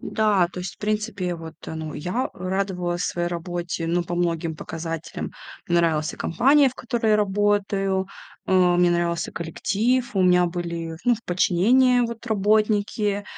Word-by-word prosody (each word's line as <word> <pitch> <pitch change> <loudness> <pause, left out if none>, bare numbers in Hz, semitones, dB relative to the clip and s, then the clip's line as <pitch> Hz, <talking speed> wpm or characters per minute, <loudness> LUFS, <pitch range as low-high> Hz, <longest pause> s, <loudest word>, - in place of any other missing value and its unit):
Да, 205 -5 +2
то 180 - -6
есть 180 0 -6
в - - -36
принципе 210 -2 -2
я 175 -1 -2
вот, 160 -1 -9
э, - - -5
ну, 155 -1 -5
я 180 - -2
радовалась 185 -1 -2
своей 175 -1 -1
работе, 175 -1 -4
ну, 175 +1 +1
по 175 +1 -4
многим 170 -2 -1
показателям. 165 0 -5 0.4
Мне 175 - +2
нравилась 160 -2 +1
и - - -11
компания, 275 - +4
в 255 - -10
которой 230 -2 -1
я 210 - +5
работаю, 200 -1 +1 0.4
а, 180 -2 +4
мне 175 0 +4
нравился 170 -1 -1
коллектив, 220 +9 -1
у 190 - +3
меня 180 -1 +4
были, 170 -2 -4
ну, 245 - +4
в 230 - -11
подчинении 240 +9 +3
вот 235 0 -3
работники, 210 -1 +1
185 Hz, 165 wpm, -23 LUFS, 170-210 Hz, 0.4 s, я